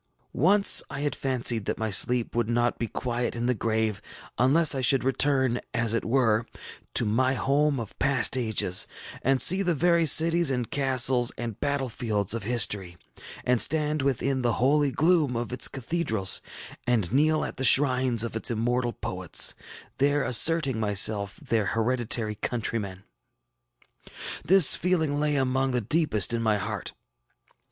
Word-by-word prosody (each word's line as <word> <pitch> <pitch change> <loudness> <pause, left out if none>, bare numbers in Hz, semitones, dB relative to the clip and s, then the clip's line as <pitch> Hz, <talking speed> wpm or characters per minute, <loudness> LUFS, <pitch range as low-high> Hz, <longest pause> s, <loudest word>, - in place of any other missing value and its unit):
Once 200 +7 +4
I 135 - -7
had 145 0 -3
fancied 120 -5 -2
that - - -4
my 110 -1 -4
sleep 120 +4 +1
would 120 -1 -2
not 120 0 -1
be 115 - -3
quiet 120 +1 -4
in 120 0 -4
the 125 - +1
grave 110 -2 -3 0.4
unless 150 +6 +4
I 135 - -3
should 130 +1 +2
return, 130 -2 0
as 120 -2 -1
it 115 - -2
were, 115 -2 0 0.5
to - - +4
my 130 +5 0
home 140 +1 0
of 115 -3 -10
past 135 -1 +1
ages, 110 -7 +2 0.3
and 135 0 0
see 185 +8 +5
the 175 -3 0
very 170 +1 +1
cities, 165 +2 +4
and 125 -3 -3
castles, 130 -3 +2
and 115 -3 -7
battle 140 -2 -2
fields 110 -4 -2
of 115 - -4
history, 100 -5 0 0.5
and 125 -2 +1
stand 150 -1 +1
within 135 0 -2
the 120 -2 -1
holy 140 +3 +1
gloom 155 -2 +1
of 120 +1 -5
its 125 - +2
cathedrals, 115 - 0 0.5
and 115 -5 -1
kneel 155 +3 +1
at - - -8
the 130 - -4
shrines 130 -3 +3
of 115 - -6
its 115 - -2
immortal 120 +1 -2
poets, - - 0 0.5
there 145 +1 +1
asserting 140 -1 +3
myself 105 -1 +1
their 110 -3 -3
hereditary 115 -2 -1
countryman. 105 -4 -4 1.4
This 190 -4 +7
feeling 160 -5 -1
lay 150 0 0
among 130 -1 -1
the 125 - 0
deepest 120 - 0
in 115 - -2
my 110 -2 0
heart. 105 -1 -6
125 Hz, 155 wpm, -25 LUFS, 115-140 Hz, 1.4 s, This